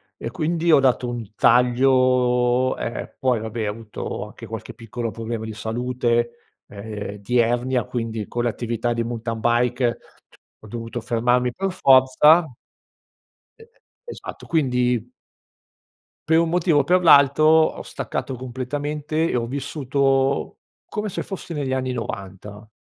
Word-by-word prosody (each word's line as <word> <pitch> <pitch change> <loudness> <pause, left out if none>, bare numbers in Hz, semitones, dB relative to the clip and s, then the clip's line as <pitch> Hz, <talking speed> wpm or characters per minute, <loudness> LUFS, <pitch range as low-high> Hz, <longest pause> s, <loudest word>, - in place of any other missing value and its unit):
e - - -6
quindi 165 +6 0
ho 155 - +7
dato 130 -2 +2
un 115 -4 -6
taglio 125 0 +3
ehm, 115 - -5
poi 125 -3 +1
vabbè, 110 0 -4
ho - - 0
avuto 110 0 -6
anche - - -11
qualche - - -8
piccolo 115 +1 -5
problema 115 0 -5
di 110 - -6
salute, 120 +1 -2
ehm, 105 0 -7
di 120 +5 0
ernia 120 +1 +1
quindi 115 -3 -4
con 120 - -2
l'attività 120 0 -1
di 115 0 -1
mountain 115 -1 -4
bike 120 +1 +1 0.6
ho - - -15
dovuto 115 +2 -6
fermarmi 120 +2 +1
per 195 0 -2
forza, 140 +1 +5 1.1
e 455 0 -18 0.4
esatto, - - -9
quindi 125 -6 0 1.2
per 160 0 +5
un 165 0 +1
motivo 170 -3 +2
o - - +3
per 180 +5 +2
l'altro 140 -2 +6
ho 160 0 +4
staccato 130 - -4
completamente 145 +5 -3
e - - -1
ho 120 -1 0
vissuto 135 0 0 0.3
come 210 0 -3
se - - -4
fossi 190 -3 -7
negli 145 -4 -3
anni 130 -1 -1
'90. 105 -2 -7
125 Hz, 135 wpm, -22 LUFS, 115-140 Hz, 1.2 s, ho